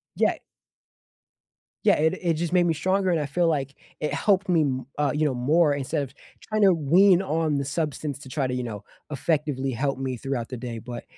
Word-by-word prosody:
Yeah. - - +2 1.5
Yeah, - - +6
it 160 +3 +2
it 170 -2 +1
just 170 +2 -2
made 175 -1 +4
me 165 - +2
stronger, 185 +4 +1
and 170 - +1
I 150 - -1
feel, 170 +5 +1
like, 140 -3 -2 0.2
it 150 - -2
helped 200 -1 +2
me 175 -3 +3
m 130 -4 -1
uh, 145 -2 +1
you 150 +1 +1
know, 145 - +1
more 145 +5 +3
instead 140 +1 -2
of 130 - -9 0.3
trying 215 0 -2
to 195 -3 +6
wean 175 +5 +4
on 160 -4 0
the 140 - -2
substance 150 -1 -3
to 135 - -11
try 135 0 -1
to, 125 - -3
you 125 - -2
know, 105 -4 -6 0.3
effectively 145 -2 -1
help 135 +3 -1
me 130 -1 -2
throughout 125 -1 -3
the 130 - -5
day, 120 -1 -6
but, 120 +1 -7
145 Hz, 215 wpm, -25 LUFS, 130-170 Hz, 1.5 s, Yeah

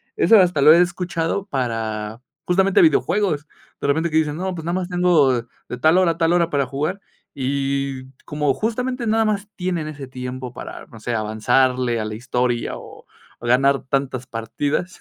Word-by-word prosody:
eso 230 - +6
hasta 180 -6 +3
lo 155 +2 +8
he 170 - +6
escuchado 175 +1 -1
para 115 - -3 0.2
justamente 190 - +3
videojuegos, 200 - +2 0.3
de - - -1
repente 160 +4 +1
que 155 - +1
dicen: 150 -1 0
"No, 185 +1 -2
pues 160 - -7
nada 170 - -1
más 185 -1 -2
tengo 175 -7 +3 0.4
de 125 - -4
tal 160 +6 +4
hora 180 -3 +4
a 165 - -6
tal 165 0 +2
hora 170 -1 +2
para 140 -3 +1
jugar". 150 +9 -3 0.3
Y 135 -1 -2 0.2
como 150 -2 0
justamente 250 +2 -2
nada 225 +1 +3
más 205 -1 -1
tienen 175 -4 -2
ese 145 -3 -7
tiempo 125 0 -6
para, - - -9
no 115 - -13
sé, 120 +2 -3
avanzarle 120 +3 +1
a 110 - -2
la 110 - -5
historia 120 +1 -1
o - - -13 0.4
o 120 - -5
ganar 135 +2 +3
tantas 130 -2 -2
partidas. 140 +9 -3
145 Hz, 180 wpm, -21 LUFS, 125-180 Hz, 0.4 s, lo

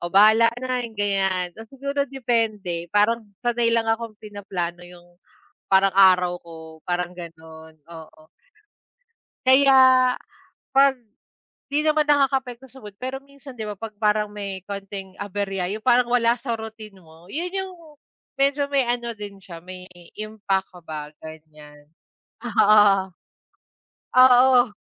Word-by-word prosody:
"Oh, 175 - -4
bahala 215 +5 +6
na," 255 0 -2
yung 220 - -19
ganyan. 195 -3 0
Ta's 225 +4 -13
siguro 280 +1 -3
depende, 220 -9 -2
parang 210 +3 +1 0.2
sanay 240 -1 +1
lang 230 -1 +1
akong 225 -1 -5
pinaplano 190 -5 -6
yung 175 -1 -15 0.7
parang 195 0 +4
araw 180 -2 +5
ko 165 -1 -12 0.3
parang 180 0 -3
ganun, 160 -2 -12 0.2
oo. 160 -1 -13 1.2
Kaya 270 +1 +6 1.0
pag 275 0 +4 0.8
di 295 - +2
naman 305 0 +2
nakakaapekto 270 -3 0
sa 260 -1 -16
mood, 210 - -9
pero 260 +1 -4
minsan 280 -2 -14
'di 220 - -5
ba, 210 - -5
pag 225 -2 -8
parang 210 0 +1
may 200 -2 -6
konting 195 -1 -7
aberya 200 -2 -3
yung 215 - -5
parang 250 -1 +4
wala 235 -1 +3
sa 240 0 -5
routine 220 -3 -10
mo. 160 0 -19
Yun 345 +4 -2
yung 380 -1 -4 0.6
medyo 280 +1 +1
may 275 -2 +1
ano 240 -1 -3
din 205 -2 -9
siya, 170 -3 -12
may 185 0 -10 0.3
impact 205 -3 -2
ka 180 - -12
ba, 155 -2 -6 0.2
ganyan. 150 -2 -14 0.6
Oo. 205 -4 +4 1.0
Oo. 255 -1 +6
210 Hz, 135 wpm, -23 LUFS, 185-245 Hz, 1.2 s, bahala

